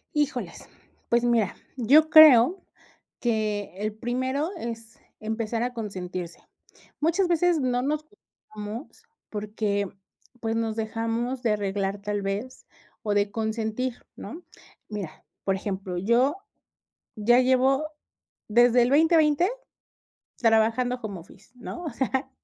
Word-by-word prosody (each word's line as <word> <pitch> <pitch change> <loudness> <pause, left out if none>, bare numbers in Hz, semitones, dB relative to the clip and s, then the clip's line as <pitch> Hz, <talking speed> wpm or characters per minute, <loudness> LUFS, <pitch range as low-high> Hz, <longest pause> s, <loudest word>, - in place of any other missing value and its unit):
Híjoles, 285 -4 -2 0.4
pues 235 0 +3
mira, 230 -5 +2 0.2
yo 285 +6 +4
creo 310 +2 +8 0.6
que 215 -4 -1
el 210 +1 -3
primero 260 +7 -2
es 230 -5 -7 0.2
empezar 225 +1 -2
a 250 - -2
consentirse, 185 -6 -5 0.6
muchas 340 +5 +2
veces 345 0 +2
no 250 -2 0
nos 300 +3 -1
cuidamos 220 - -11 0.3
porque, 210 -1 -2 0.5
pues, 225 -1 -2
nos 225 -1 -1
dejamos 230 +3 -2
de 230 -4 +2
arreglar 200 -1 -2
tal 205 0 -2
vez 205 +6 -5 0.3
o 210 -2 -1
de 205 0 +1
consentir, 225 +3 -3
¿no?, 345 +2 -9 0.4
mira, 205 -6 -7 0.2
por 195 - +2
ejemplo, 190 -2 -4
yo 235 - +2 0.8
ya 240 +4 +4
llevo 260 +2 +3 0.6
desde 240 +2 +5
el 240 - +1
2020 320 +2 +4 0.9
trabajando 230 +2 +2
home 200 -5 -5
office, 190 +6 -18
¿no?, 350 +7 -7
o 315 - -3
sea, 265 0 -2
230 Hz, 120 wpm, -26 LUFS, 210-260 Hz, 0.9 s, creo